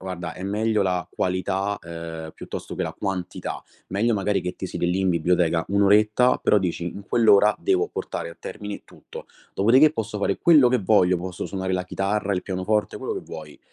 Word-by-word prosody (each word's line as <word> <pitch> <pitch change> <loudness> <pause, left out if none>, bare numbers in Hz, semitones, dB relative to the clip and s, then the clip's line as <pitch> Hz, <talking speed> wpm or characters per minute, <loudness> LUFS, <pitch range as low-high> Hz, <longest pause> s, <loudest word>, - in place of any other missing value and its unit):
guarda, 90 -3 -5
è - - -9
meglio 105 +2 0
la 90 -3 0
qualità, 95 +2 -1
uhm, 85 -1 -7
piuttosto - - -7
che - - -2
la - - -4
quantità. 95 -3 -4 0.3
Meglio 110 +5 +1
magari 100 -1 0
che 90 0 -4
ti - - -6
siedi 85 -1 -2
lì 95 +2 0
in 95 -1 +2
biblioteca 85 -1 +2
1 100 +2 +2
oretta 105 +5 +4
però - - +4
dici: 90 -2 -2
“In 100 +3 -6
quell'ora 105 -2 +5
devo 390 +2 +1
portare - - -5
a - - -13
termine 105 -1 -7
tutto, - - -12 0.3
dopodiché 130 +9 +5
posso 110 -6 -4
fare 100 -1 0
quello 150 -7 +6
che 125 +1 +2
voglio, 90 -3 +3
posso 90 0 -5
suonare 95 -1 -3
la 90 - -2
chitarra, 100 +2 -1
il 90 - 0
pianoforte", 100 +3 -1
quello - - -4
che - - -4
vuoi. 75 -2 -10
95 Hz, 190 wpm, -24 LUFS, 90-105 Hz, 0.3 s, quello